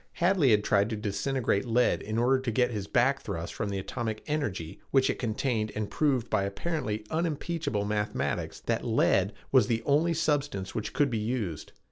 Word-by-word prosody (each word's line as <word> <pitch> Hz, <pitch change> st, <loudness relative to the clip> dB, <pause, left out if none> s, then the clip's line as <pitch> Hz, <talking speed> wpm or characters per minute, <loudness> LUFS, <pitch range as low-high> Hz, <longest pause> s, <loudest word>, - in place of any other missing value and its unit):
Hadley 175 Hz, -5 st, +3 dB
had 105 Hz, -2 st, +4 dB
tried 100 Hz, +1 st, +2 dB
to 110 Hz, -, -2 dB
disintegrate 105 Hz, +1 st, 0 dB
lead 120 Hz, +1 st, +2 dB
in 110 Hz, +2 st, -3 dB
order 130 Hz, +3 st, +3 dB
to 130 Hz, -2 st, -3 dB
get 125 Hz, +2 st, +2 dB
his 105 Hz, -3 st, -4 dB
back 130 Hz, +5 st, +2 dB
thrust 85 Hz, -4 st, -5 dB
from 105 Hz, -, -3 dB
the 100 Hz, -, -2 dB
atomic 110 Hz, +3 st, -4 dB
energy 105 Hz, -, -3 dB
which 135 Hz, -1 st, +3 dB
it -, -, -6 dB
contained 110 Hz, -2 st, -1 dB
and 105 Hz, -1 st, -3 dB
proved 135 Hz, -6 st, +1 dB
by 110 Hz, -3 st, +1 dB
apparently 105 Hz, +2 st, -3 dB
unimpeachable 160 Hz, -8 st, -1 dB
mathematics 105 Hz, 0 st, -2 dB
that -, -, -1 dB
lead 95 Hz, +2 st, +2 dB, 0.2 s
was 130 Hz, -6 st, +5 dB
the 115 Hz, -1 st, 0 dB
only 160 Hz, +4 st, +3 dB
substance 145 Hz, -11 st, -1 dB
which 110 Hz, 0 st, -4 dB
could 145 Hz, -3 st, +2 dB
be 115 Hz, -, 0 dB
used. 105 Hz, -, -3 dB
115 Hz, 180 wpm, -29 LUFS, 105-140 Hz, 0.2 s, was